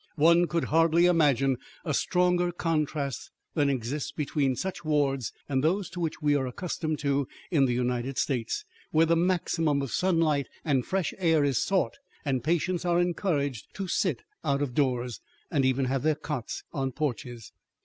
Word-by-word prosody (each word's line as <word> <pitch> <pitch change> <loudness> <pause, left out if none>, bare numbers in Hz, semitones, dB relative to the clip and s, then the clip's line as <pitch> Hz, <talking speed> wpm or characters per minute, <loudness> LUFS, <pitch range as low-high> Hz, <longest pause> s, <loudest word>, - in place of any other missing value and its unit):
One 170 +2 +5
could 165 +1 0
hardly 165 +1 +5
imagine 140 -7 +3 0.3
a 155 - -1
stronger 180 +3 +2
contrast 155 -5 -2 0.2
than 145 -3 +2
exists 135 +2 -2
between 140 -3 0
such 190 +6 -4
wards 140 -6 +1 0.2
and 135 -1 0
those 185 +3 +1
to 180 - -6
which 160 -3 -3
we 145 -1 +4
are 135 -2 +1
accustomed 155 +2 -3
in 140 +2 0
the 125 - +1
United 125 +1 -1
States, 135 - -1 0.2
where 160 +1 +4
the 165 +1 +3
maximum 165 -4 +1
of 135 - -5
sunlight 165 -6 +2 0.2
and 135 -5 +2
fresh 185 +1 -1
air 165 -4 +3
is 140 -4 +2
sought 195 +7 0 0.3
and 130 -4 0
patients 175 +3 0
are 175 -1 +2
encouraged 155 - -1
to 195 -2 -4
sit - - 0 0.2
out 140 0 +1
of 130 -4 -3
doors, 125 - 0 0.3
and 135 -2 +2
even 130 0 +2
have 130 +1 0
their 155 +2 +2
cots 150 -5 -5
on 135 -2 -2
porches. 125 -5 -4
150 Hz, 165 wpm, -28 LUFS, 135-170 Hz, 0.3 s, One